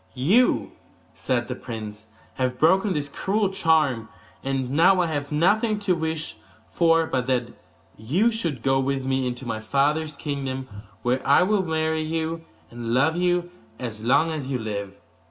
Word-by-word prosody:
'You,' 195 - +3 0.4
said 120 -2 -1
the 125 - -3
prince, 110 -3 -8 0.3
'have 130 -1 -1
broken 185 +6 +3
his 145 -1 -2
cruel 200 +7 0
charm, 155 - +1 0.3
and 135 -2 -2
now 180 +6 +5
I 180 - +3
have 145 -3 -3
nothing 210 +8 +2
to 200 -3 +1
wish 160 -1 -3 0.3
for 165 -1 +3
but 130 -5 -2
that 125 -2 0 0.4
you 170 - +1
should 165 - -3
go 135 0 +3
with 135 0 -1
me 130 -1 0
into 125 +1 -5
my 115 -2 -3
father's 145 +6 0
kingdom, 135 -2 -4 0.4
where 125 +2 +1
I 140 +5 +5
will 205 +1 +2
marry 160 -1 0
you, 160 +1 -3 0.3
and 120 0 -3
love 145 +5 +3
you 175 0 0 0.3
as 110 -3 -6
long 155 +7 +3
as 150 -4 -4
you 135 -2 -1
live. 100 -3 -5
145 Hz, 160 wpm, -24 LUFS, 125-165 Hz, 0.4 s, now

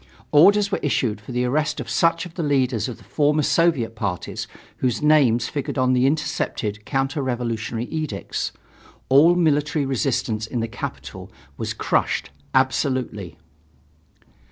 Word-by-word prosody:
Orders 200 +7 +5
were - - 0
issued 120 -7 -1
for 105 - -10
the 125 0 0
arrest 150 +4 0
of 125 - -5
such 165 +8 +2
of 175 - -11
the 175 - -4
leaders 130 -6 +1
of 120 - -7
the - - -18
former 150 0 +1
Soviet 150 -7 +2
parties 100 -5 -4 0.3
whose 125 +1 -1
names 130 -6 +4
figured 145 0 -4
on 130 0 +3
the 125 +1 +3
intercepted 105 -8 -2
counter 135 +1 -1
revolutionary 120 -3 -2
edicts. 155 -9 -3 0.6
All 150 +6 +6
military 150 -3 +1
resistance 120 -5 -1
in 120 - -3
the 115 - -1
capital - - -7 0.2
was - - -4
crushed - - 0 0.2
absolutely. 130 - 0
130 Hz, 140 wpm, -22 LUFS, 115-150 Hz, 0.6 s, All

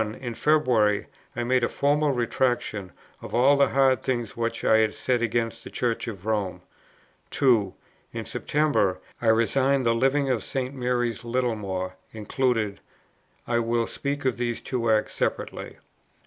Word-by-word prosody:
In 110 +3 -4
February, 120 -8 +2 0.3
I 120 - -1
made 125 0 +2
a - - +2
formal 145 +1 +1
Retractation 120 -6 -1 0.3
of - - -6
all 130 +4 +5
the 140 0 +4
hard 135 -3 +3
things 120 -5 -2
which 115 0 -2
I 110 - +5
had 110 -1 +1
said 125 -2 0
against 115 0 -1
the - - -8
Church 120 -2 -2
of 100 -4 -7
Rome. 105 -4 -2 0.7
2. 115 -8 +3 0.4
In - - -5
September, 145 -12 +1 0.2
I 120 - -1
resigned 130 +4 +3
the 115 - +4
Living 135 +4 +2
of 115 -6 -1
St. 130 0 -3
Mary's, 125 -2 -1
Littlemore 105 -7 -2 0.2
included: 110 -1 -1 0.7
I 120 0 +1
will 115 0 +1
speak 140 +2 -4
of 130 - +1
these 120 -1 -2
two 120 -3 -2
acts 110 -1 +2
separately. - - -3
120 Hz, 150 wpm, -25 LUFS, 110-130 Hz, 0.7 s, all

